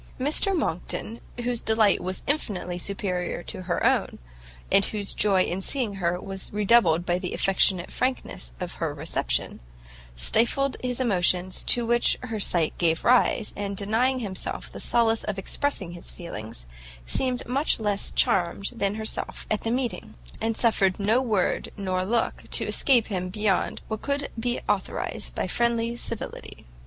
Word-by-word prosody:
Mr 310 +8 +2
Monckton, 225 - -3 0.2
whose 240 -1 0
delight 220 -2 +3
was 185 +1 -4
infinitely 200 -11 -2
superior 180 -2 -2
to - - -4
her 175 -1 -1
own, - - +2 0.5
and 195 - +5
whose 205 -2 -3
joy 195 -3 +3
in 180 +2 -2
seeing 240 0 +1
her 175 0 +1
was 195 0 -5
redoubled 205 -5 +4
by 175 0 +1
the 180 -1 -3
affectionate 190 -2 +2
frankness 255 - -2
of - - -4
her - - -1
reception, - - -1 0.6
stifled 235 - +2
the 250 -1 -2
emotions 185 -5 +1
to 240 -1 +4
which 240 +1 +3
her 225 -3 -4
sight 170 -5 +1
gave 165 -2 +2
rise, 240 -2 +3
and 200 -1 -4
denying 225 +6 +1
himself 195 -4 -4
the - - -8
solace 225 -1 +2
of 210 -2 -2
expressing 195 -2 -2
his 175 0 -9
feelings, 110 - -8 0.4
seemed 250 - +1
much 270 +3 +1
less 205 -2 -1
charmed 190 +3 +1
than 200 -3 -1
herself 220 0 -2
at 215 - +1
the 225 - -2
meeting, 240 -5 -2 0.3
and 225 0 -1
suffered 195 -5 +3
no 220 +5 +3
word 215 -8 0
nor 185 -2 -1
look 230 +4 -1
to - - +1
escape 245 -5 +3
him 185 -3 -3
beyond 205 -1 0
what 220 -1 -4
could 280 0 -2
be 240 +1 -1
authorised - - -2
by - - -1
friendly 235 0 0
civility. 230 -2 -7
210 Hz, 155 wpm, -26 LUFS, 185-235 Hz, 0.6 s, and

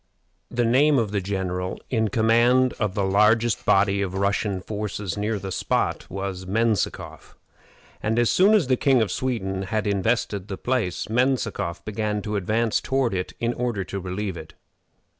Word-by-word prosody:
The 120 0 0
name 140 +5 +4
of 110 -5 0
the 100 -2 0
general 90 -1 -3
in 110 -3 +2
command 120 +4 +3
of 105 -3 -1
the 100 - 0
largest 105 +4 +3
body 100 0 +3
of 95 -1 -3
Russian 100 0 0
forces 105 -2 -4
near 105 +1 -1
the 95 -1 -6
spot - - -1
was 95 -1 -5
Menzikoff, 110 +1 -1 0.7
and 110 +2 0
as 120 -1 +3
soon 200 +4 +5
as 200 -8 +3
the 130 0 +2
King 130 -4 +3
of 100 - -3
Sweden 95 -7 -2
had 105 +3 -2
invested 100 -1 0
the 95 -3 -5
place, 110 -6 -1
Menzikoff 115 -7 -1
began 105 -1 -2
to 105 0 -3
advance 110 +3 0
toward 135 -5 0
it 90 -1 -3
in 120 +1 0
order 120 -6 -2
to 100 +1 -5
relieve 95 0 -4
it. 80 0 -11
105 Hz, 165 wpm, -24 LUFS, 95-120 Hz, 0.7 s, soon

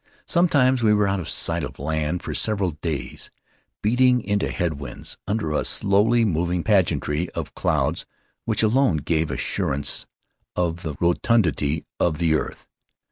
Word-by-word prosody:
Sometimes 140 -8 +3
we 105 -2 +4
were 105 -1 +2
out 100 0 0
of 85 - -5
sight - - 0
of - - -6
land 80 +4 -2
for - - -4
several 100 -4 0
days, 75 -1 -4 0.5
beating 125 +3 +4
into 100 -1 0
head 80 -5 -2
winds 70 - -7
under 105 -7 -1
a 75 - +1
slowly 105 +4 +3
moving 85 -2 0
pageantry 90 -5 +1
of - - -4
clouds - - 0 0.4
which - - +1
alone 110 - +3
gave 80 +1 0
assurance 70 +1 -2 0.5
of 85 -1 -1
the 80 -5 -4
rotundity 85 - +1
of 80 -3 +1
the 80 -1 +2
earth. 80 - -3
90 Hz, 145 wpm, -23 LUFS, 80-110 Hz, 0.5 s, we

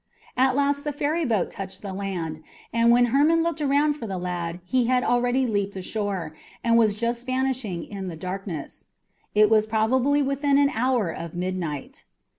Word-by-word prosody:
At 260 +1 +3
last 285 0 +1
the 295 - -2
ferryboat 290 - 0
touched 190 0 -7
the 195 -2 -5
land, 175 -5 -4 0.3
and 230 0 +4
when 245 +1 +6
Hermon 320 +4 +4
looked 335 -1 -2
around 290 +1 +3
for 245 -6 -7
the 190 -2 -3
lad 175 -1 -3
he 250 +4 +1
had 250 0 +2
already 245 +2 +2
leaped 205 -3 -1
ashore, 190 -4 -3 0.3
and 230 -1 +3
was 220 -3 +4
just 235 +3 -2
vanishing 255 -9 -1
in 195 -2 -6
the 170 - -5
darkness. 185 -3 -6 0.5
It 210 0 +6
was 215 0 +3
probably 255 +6 +2
within 275 +1 +1
an 285 0 +4
hour 235 -6 +1
of 170 +1 -7
midnight. 175 -5 -4
230 Hz, 170 wpm, -25 LUFS, 190-265 Hz, 0.5 s, when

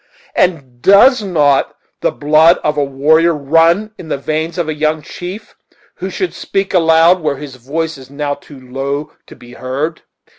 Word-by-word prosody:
and 135 -9 -1
does 220 - +6
not 150 -8 +1 0.3
the - - +2
blood 155 +3 +4
of 150 - 0
a 145 - +1
warrior 155 +5 +2
run 165 +8 +2
in 165 - -9
the - - -1
veins 155 +4 -3
of 170 -3 -1
a 155 - -1
young 155 +1 0
chief, 180 +6 -8 0.4
who - - -4
should 370 - -3
speak 195 0 -3
aloud 165 +1 +4
where 150 -3 -1
his 140 -2 -9
voice 155 +4 -4
is 130 0 -14
now 145 0 -3
too 145 -1 -13
low 135 +3 -5
to - - -13
be 120 0 -15
heard?" 140 +6 -4
155 Hz, 175 wpm, -15 LUFS, 140-170 Hz, 0.4 s, does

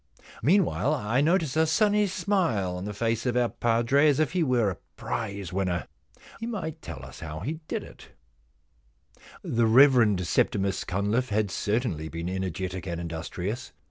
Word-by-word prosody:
Meanwhile 165 -4 +2
I 115 +1 0
notice 160 -2 +2
a 160 0 +3
sunny 210 +5 +3
smile 170 - 0
on 90 +1 -5
the 105 - -3
face 115 +2 -1
of 125 0 +1
our 120 -1 +2
padre, 120 +6 +3
as 145 0 +2
if 155 -3 +2
he 180 - 0
were 125 -8 +2
a 90 - -7 0.2
prize 100 -5 -4
winner. 95 -2 -1 0.5
He 230 - -4
might 160 -9 -4
tell 75 -6 -8
us 65 - -11
how 80 -1 -6
he 155 - -4
did - - -3
it' - - -14 1.4
The 115 -1 +1
Rev. 120 -5 +6
Septimus 95 +2 0
Cunliffe 105 +7 0
had 105 -2 0
certainly 100 - -1
been 85 +2 -4
energetic 95 0 -3
and 85 -1 -3
industrious. 85 - -5
115 Hz, 160 wpm, -27 LUFS, 95-145 Hz, 1.4 s, Rev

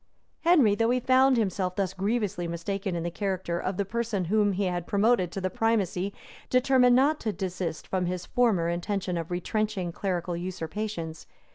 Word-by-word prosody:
Henry, 310 -11 +5
though 225 +2 +1
he 250 +1 +2
found 260 +1 +4
himself 190 -4 0
thus 190 -2 -1
grievously 200 -2 -1
mistaken 185 +3 -3
in 170 - -2
the 175 - -2
character 185 -2 -2
of 185 +1 -3
the 200 - 0
person 215 -2 -2
whom 205 +2 +2
he 195 +2 -1
had 175 -2 -2
promoted 200 -3 +2
to 195 - -4
the 185 -1 -2
primacy, 200 -3 0 0.4
determined 255 -1 +4
not 285 +4 +3
to 220 - -1
desist 185 -5 -4
from 185 -2 -1
his 180 0 -3
former 225 -10 +2
intention 180 +2 -2
of 165 -1 -3
retrenching 185 +1 -2
clerical 175 -1 -2
usurpations. 170 -1 -5
195 Hz, 170 wpm, -27 LUFS, 175-220 Hz, 0.4 s, Henry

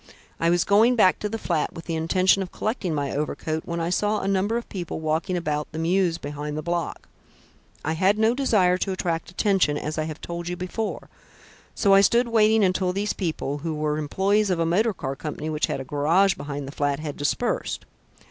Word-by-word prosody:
I 165 - +2
was 175 0 +3
going 220 +5 +4
back 190 -5 +4
to 210 - -2
the 225 - -3
flat 170 -7 -1
with 165 - -9
the 170 - -3
intention 185 +4 +3
of 185 - -5
collecting 210 -7 -2
my 140 -1 -1
overcoat, 155 +2 -3
when 170 0 -3
I 165 +1 -1
saw 210 +3 +1
a - - -3
number 200 +4 +1
of 235 - -5
people 175 -5 -5
walking 160 +3 -1
about 150 -3 -2
the 155 - -7
mews 170 +1 +1
behind 150 0 -5
the 155 - -4
block. 170 -2 -3 0.8
I 160 - 0
had 190 +5 +2
no 220 +2 +3
desire 200 -9 +2
to 195 - -1
attract 170 -3 -2
attention, 185 -5 +2
as 155 +1 -3
I 155 - 0
have 155 -1 -6
told 170 0 -6
you 180 - -2
before, 195 +5 -4 0.7
so 200 -2 +3
I 195 - +8
stood 235 +4 +3
waiting 220 -1 +4
until 185 -1 +1
these 205 +2 -1
people, 155 -5 -3
who 160 +1 -3
were 150 0 -1
employees 195 +7 +1
of 180 - +1
a 165 - +1
motor 205 +6 +2
car 135 -4 -4
company 150 +2 -5
which 150 0 0
had - - -2
a - - -4
garage 165 +8 +3
behind 145 -1 -6
the - - -6
flat, 145 -1 -1
had 155 -2 -5
dispersed. 145 -1 -1
175 Hz, 215 wpm, -24 LUFS, 155-195 Hz, 0.8 s, I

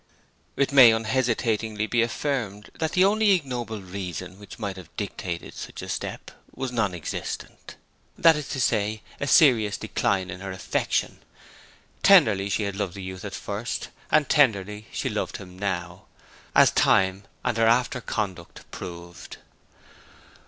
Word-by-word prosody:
It 140 - +1
may 130 -4 +9
unhesitatingly 110 -2 0
be 120 +1 +1
affirmed 115 -4 -2
that 160 -1 -1
the 185 +1 +5
only 210 0 +4
ignoble 120 - -3
reason 90 0 -6
which 105 -2 -11
might 100 -4 -4
have 90 -4 -11
dictated 95 -4 -5
such - - -8
a - - -7
step - - -5 0.2
was 130 -2 -3
non 110 -7 0
existent; 80 - -6 0.4
that 165 -1 +6
is 150 -2 -5
to 135 - -3
say, 110 -3 0 0.2
a 140 - -2
serious 120 - +5
decline 95 -2 -1
in 90 - -7
her 95 0 -6
affection. 95 - -1 0.8
Tenderly 100 -2 +5
she 105 - 0
had 100 -1 -3
loved 100 -3 -3
the 100 - -7
youth 95 +2 -7
at 105 - -5
first, 105 +4 -4 0.2
and 150 -2 +3
tenderly 105 -6 +2
she - - -3
loved - - -3
him 90 -1 -12
now, 90 -2 -3 0.5
as - - +7
time 95 +1 +2 0.2
and - - +1
her 115 0 +4
after 125 +2 +2
conduct 95 -7 -4
proved. 85 0 -9
105 Hz, 150 wpm, -25 LUFS, 95-125 Hz, 0.8 s, may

